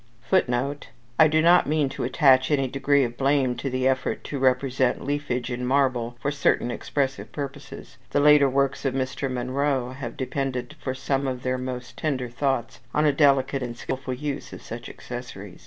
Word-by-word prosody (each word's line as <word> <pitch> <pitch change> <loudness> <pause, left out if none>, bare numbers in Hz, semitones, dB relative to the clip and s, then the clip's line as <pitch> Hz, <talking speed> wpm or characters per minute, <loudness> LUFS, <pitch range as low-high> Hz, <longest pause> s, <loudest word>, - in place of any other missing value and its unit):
[Footnote: 140 -5 0 0.3
I 160 - +8
do 155 +1 +2
not 175 +1 +5
mean 150 -2 +2
to 140 - -5
attach 130 0 +4
any 135 -3 +2
degree 140 +2 +2
of 120 -1 -4
blame 135 -2 +2
to 135 +3 -3
the 130 0 0
effort 130 0 -1
to 140 - -4
represent 130 0 +1
leafage 135 -4 -2
in 120 +1 -3
marble 125 -3 +1
for 140 +5 -1
certain 145 -4 +1
expressive 135 +2 -2
purposes. 140 -2 -8
The - - +1
later 145 -1 +6
works 140 +1 0
of 135 -2 -1
Mr. 130 +1 -2
Munro 130 +1 -1
have 130 -3 -7
depended 130 +1 -3
for 130 -1 -3
some 135 +1 -1
of 125 -1 -4
their 130 0 -1
most 125 -1 -6
tender 130 -5 -2
thoughts 120 -1 -2 0.2
on 150 - +3
a 145 - +4
delicate 135 -2 +3
and 120 -1 -5
skilful 130 +1 -4
use 145 +1 -5
of - - -10
such 115 +1 -7
accessories. 120 -6 -8
130 Hz, 180 wpm, -25 LUFS, 125-140 Hz, 0.3 s, I